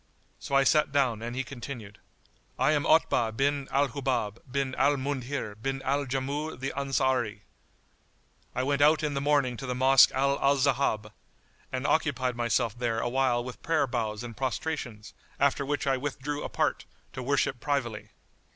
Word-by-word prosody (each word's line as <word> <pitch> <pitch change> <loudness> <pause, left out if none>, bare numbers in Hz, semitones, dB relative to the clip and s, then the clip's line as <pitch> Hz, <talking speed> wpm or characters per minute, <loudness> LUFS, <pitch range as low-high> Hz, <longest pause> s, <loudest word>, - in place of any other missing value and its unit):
So 140 - -3
I 135 - +6
sat 150 +2 +3
down 125 -6 +1
and 120 +1 -5
he 130 - -1
continued, 120 -6 -8 0.6
"I 130 +4 +3
am 145 -2 +1
Otbah 120 -8 +3
bin 140 0 +1
al 140 +1 +2
Hubáb 120 -6 -2
bin 135 -1 -1
al 140 +3 +3
Mundhir 135 -4 -3
bin 135 +2 -2
al 140 +1 0
Jamúh 140 +4 -3
the 135 +1 -3
Ansári.[FN#81] 130 -6 0 1.1
I 125 - 0
went 140 +1 0
out 155 +2 +5
in 150 -1 0
the 140 - -1
morning 140 -3 +2
to 135 - -6
the 125 - -2
Mosque 130 +1 +6
Al 140 +1 +1
Ahzáb[FN#82] 135 -6 +1 0.6
and 130 +1 -3
occupied 130 -6 +1
myself 120 -2 0
there 120 -2 -1
awhile 120 0 +1
with 125 0 -8
prayer 160 -3 +2
bows 115 -4 -3
and 120 -2 -7
prostrations, 130 -4 -4 0.3
after 140 0 +2
which 145 +1 -2
I 135 -1 +2
withdrew 145 +2 -4
apart, - - -1 0.3
to 130 - -5
worship 135 -1 0
privily. 120 -6 -2
135 Hz, 160 wpm, -28 LUFS, 120-140 Hz, 1.1 s, I